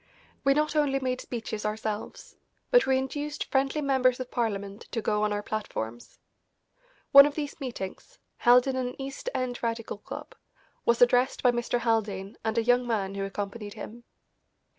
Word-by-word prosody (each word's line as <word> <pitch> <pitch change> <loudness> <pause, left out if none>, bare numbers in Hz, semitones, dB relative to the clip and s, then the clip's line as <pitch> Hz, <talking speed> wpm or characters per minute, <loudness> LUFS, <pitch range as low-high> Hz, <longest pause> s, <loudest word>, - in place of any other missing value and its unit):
We 275 0 +4
not 305 +1 +1
only 285 -3 +2
made 255 -1 -2
speeches 225 -3 -5
ourselves, 215 0 -4 0.4
but - - +5
we 265 0 +4
induced 290 +3 -3
friendly 270 +3 +1
members 260 -3 +2
of 255 -1 -6
Parliament 200 -3 -3
to 235 - 0
go 210 -1 0
on 210 0 +1
our 205 0 -2
platforms. 120 - -5 0.9
One 280 +1 +10
of 290 - -5
these 295 -1 -4
meetings, 250 - -6 0.2
held 245 0 +6
in 265 -1 -1
an 250 0 -3
East 275 - -5
End 250 -1 -2
Radical 230 -3 -3
club, - - -8 0.5
was 235 +1 +5
addressed 245 +2 +3
by 250 - +6
Mr. 240 0 -1
Haldane 210 -4 -1
and 220 0 -1
a 230 - +3
young 245 +1 +3
man 200 -4 -1
who 195 0 -3
accompanied 205 +1 -5
him. 235 +2 -9
240 Hz, 165 wpm, -28 LUFS, 210-265 Hz, 0.9 s, One